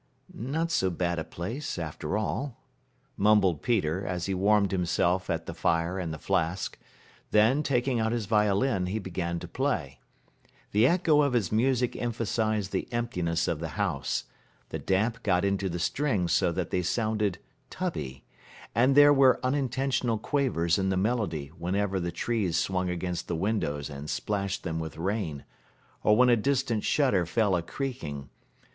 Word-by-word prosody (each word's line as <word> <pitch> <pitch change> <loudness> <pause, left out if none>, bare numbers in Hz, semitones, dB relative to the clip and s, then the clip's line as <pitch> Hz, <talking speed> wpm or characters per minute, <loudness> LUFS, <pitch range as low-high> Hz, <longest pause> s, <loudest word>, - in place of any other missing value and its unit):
"Not 155 +8 -2
so 95 - +2
bad 85 -1 -1
a - - -2
place, 115 - -5
after 80 -3 -3
all," 115 - -3 0.6
mumbled 100 -5 +4
Peter, 95 -7 0
as 90 -2 -3
he 95 - -1
warmed 100 +1 +3
himself 90 0 +1
at 80 -1 -1
the - - -5
fire 85 +3 0
and 85 -3 -3
the 80 - -5
flask; 90 +1 -1 0.5
then, 110 +7 +4
taking 130 -3 +1
out 110 0 +1
his 115 -3 -1
violin, 105 0 +2
he 100 +4 -2
began 85 -4 -3
to 90 - -7
play. 90 - -2 0.7
The 110 +4 +5
echo 165 -2 +4
of 140 -3 +1
his 110 -8 +1
music 125 +2 +1
emphasized 110 -3 -1
the - - -3
emptiness 90 -9 -1
of 80 - -1
the 80 -2 -6
house, - - -1 0.5
the - - -4
damp 110 +5 0
got 90 -3 +2
into 100 -1 0
the 85 - -3
strings 105 - 0
so - - +3
that - - -3
they 90 - +1
sounded 105 0 0 0.3
tubby, 75 - -4 0.5
and 130 +3 +3
there 145 0 +8
were 135 -2 +5
unintentional 130 -3 0
quavers 105 - +1
in 95 0 +1
the 95 - +1
melody 95 - -1
whenever 95 +4 -1
the 85 -1 -2
trees 95 -2 -1
swung 90 +1 0
against 90 0 -3
the 85 - -2
windows 80 -6 -1
and 70 0 -7
splashed 100 -1 -2
them 80 -3 -3
with 80 -1 -6
rain, 85 -5 -2 0.6
or 105 0 +5
when 125 0 +6
a 120 - +6
distant 120 -2 0
shutter 130 -11 +2
fell 100 +3 +1
a 85 - 0
creaking. 80 - -5
100 Hz, 165 wpm, -28 LUFS, 85-120 Hz, 0.7 s, there